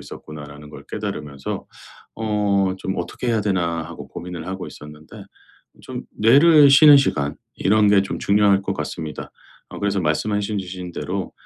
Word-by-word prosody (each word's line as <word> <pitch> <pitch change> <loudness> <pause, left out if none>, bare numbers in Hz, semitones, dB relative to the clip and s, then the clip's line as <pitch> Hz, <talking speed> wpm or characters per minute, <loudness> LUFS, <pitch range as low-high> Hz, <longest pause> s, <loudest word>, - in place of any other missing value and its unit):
있었구나.'라는 75 -1 -11
걸 - - -12
깨달으면서 70 -2 -5 0.5
'어 100 -3 0
좀 95 0 -4
어떻게 125 - -4
해야 115 -2 +1
되나.' 85 -5 -1
하고 - - -10
고민을 85 -1 -8
하고 95 0 -5
있었는데 75 +1 -12 0.6
좀 - - -7
뇌를 145 +6 +6
쉬는 145 +1 +8
시간 75 - 0 0.2
이런 105 +1 +2
게 100 -1 +5
좀 100 - -5
중요할 100 -1 +3
것 95 0 -3
같습니다. 80 -6 -6 0.4
어 - - -9
그래서 100 -1 -1
말씀하신 105 +6 -1
주신 90 -1 -7
대로 - - -4
95 Hz, 330 characters per minute, -21 LUFS, 80-105 Hz, 0.6 s, 쉬는